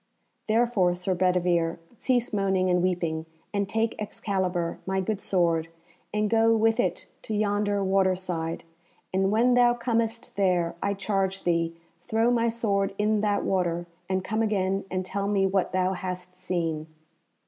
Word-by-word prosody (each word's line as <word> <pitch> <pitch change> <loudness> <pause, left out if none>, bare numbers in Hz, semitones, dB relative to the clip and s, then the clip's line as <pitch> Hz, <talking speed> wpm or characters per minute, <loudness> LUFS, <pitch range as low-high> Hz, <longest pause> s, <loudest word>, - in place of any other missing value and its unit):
Therefore, 220 -5 +2
Sir 180 +1 -1
Bedivere, 175 -2 +1 0.2
cease 245 0 0
moaning 190 -2 +2
and 180 0 +3
weeping, 170 -3 -1 0.3
and 200 -1 0
take 225 +1 -1
Excalibur, 185 -5 -2
my 190 0 0
good 195 +2 -1
sword, 170 -3 +1 0.4
and 210 0 +1
go 225 +1 +4
with 225 +1 +2
it 180 -5 0 0.2
to 215 - -4
yonder 205 -1 +1
water 190 -1 +3
side, 170 -3 -4 0.5
and 190 +1 +2
when 235 +4 +3
thou 245 -1 +5
comest 230 -1 -1
there, 180 -4 +2
I 200 0 0
charge 195 -1 -1
thee, 165 -1 +1 0.3
throw 225 +6 +1
my 235 -1 +2
sword 200 -4 0
in 210 0 +2
that 205 -1 +1
water, 175 -2 0 0.2
and 190 -1 0
come 215 +3 -1
again 195 -3 0
and 185 0 -2
tell 200 +2 -2
me 200 -1 +2
what 190 -1 +1
thou 185 0 +1
hast 180 -1 -5
seen." 165 -3 -2
195 Hz, 155 wpm, -27 LUFS, 180-215 Hz, 0.5 s, thou